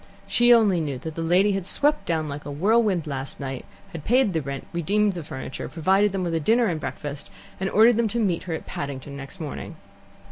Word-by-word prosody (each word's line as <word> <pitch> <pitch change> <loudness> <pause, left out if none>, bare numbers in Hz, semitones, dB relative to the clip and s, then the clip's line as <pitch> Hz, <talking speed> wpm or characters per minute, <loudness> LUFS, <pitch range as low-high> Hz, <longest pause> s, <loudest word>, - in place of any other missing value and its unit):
She 240 0 +4
only 210 -7 +5
knew 145 -4 -3
that 160 +5 -6
the 165 - -5
lady 180 +5 +3
had 195 -1 -1
swept 295 +6 +1
down 160 -2 0
like 145 0 -6
a - - -7
whirlwind 200 +2 +2
last 135 -2 -5
night, 135 -2 -5 0.3
had 165 -3 -7
paid 245 -1 +3
the 160 - 0
rent, 140 0 -5
redeemed 200 +5 +1
the 175 -3 -6
furniture, 130 -3 -6
provided 190 +5 +2
them 190 -1 -2
with 170 -2 -2
a 165 - +1
dinner 230 +10 +3
and 170 -7 -1
breakfast, 145 -2 -6 0.3
and 190 +1 -1
ordered 220 +3 +5
them 235 -1 +2
to 230 +3 -2
meet 185 -7 +1
her 165 - 0
at - - -7
Paddington 140 0 -6
next 135 0 -9
morning. 155 -3 -6
170 Hz, 220 wpm, -24 LUFS, 145-210 Hz, 0.3 s, only